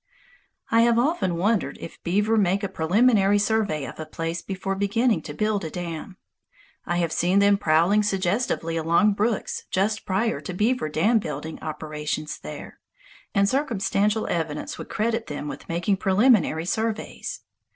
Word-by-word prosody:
I 230 - +5
have 235 0 +4
often 245 - +1
wondered 185 -5 0
if - - -10
beaver 205 +5 +1
make 200 -1 +2
a - - +1
preliminary 200 +4 +3
survey 205 -8 0
of - - -9
a 155 - -4
place 165 +2 -4
before 195 0 -3
beginning 215 +5 +1
to - - -7
build 215 -2 0
a 160 - -3
dam. 175 +2 -6 0.7
I 175 - 0
have 170 -2 0
seen 175 +4 +2
them 200 0 +5
prowling 170 +5 +3
suggestively 190 -4 0
along 170 +6 +3
brooks 210 +2 -1
just 205 +3 0
prior 190 -5 0
to 175 +4 -6
beaver 215 -4 +1
dam 210 +10 +3
building 155 -2 -6
operations 155 -1 -4
there, 75 - -9 0.6
and 200 0 +4
circumstantial 215 -4 0
evidence 160 -3 -3
would - - -8
credit 225 +1 -1
them 145 0 -5
with - - -8
making 175 +4 0
preliminary 195 -5 +3
surveys. 220 +3 -3
195 Hz, 150 wpm, -24 LUFS, 165-215 Hz, 0.7 s, I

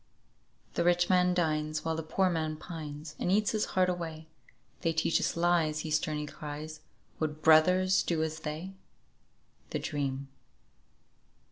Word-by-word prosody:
"The - - +1
rich 175 +1 +3
man 180 -1 +4
dines, 155 -2 0
while 160 0 0
the 160 - -2
poor 185 +4 +1
man 160 -3 -1
pines, 155 -2 -7
And 180 - 0
eats 210 +1 +3
his 215 -1 0
heart 185 -1 +5
away; 160 -3 -4 0.5
'They 165 -2 +1
teach 160 +1 +2
us - - -1
lies,' 170 -3 +2
he 160 - -5
sternly 150 -1 0
cries, 150 +1 -7 0.4
'Would 155 -1 -3
brothers 180 +4 +5
do 160 -2 0
as 160 0 -3
they?'" 160 +4 -5 1.0
"THE - - -2
DREAM." 140 -2 -3
160 Hz, 145 wpm, -30 LUFS, 155-175 Hz, 1.0 s, heart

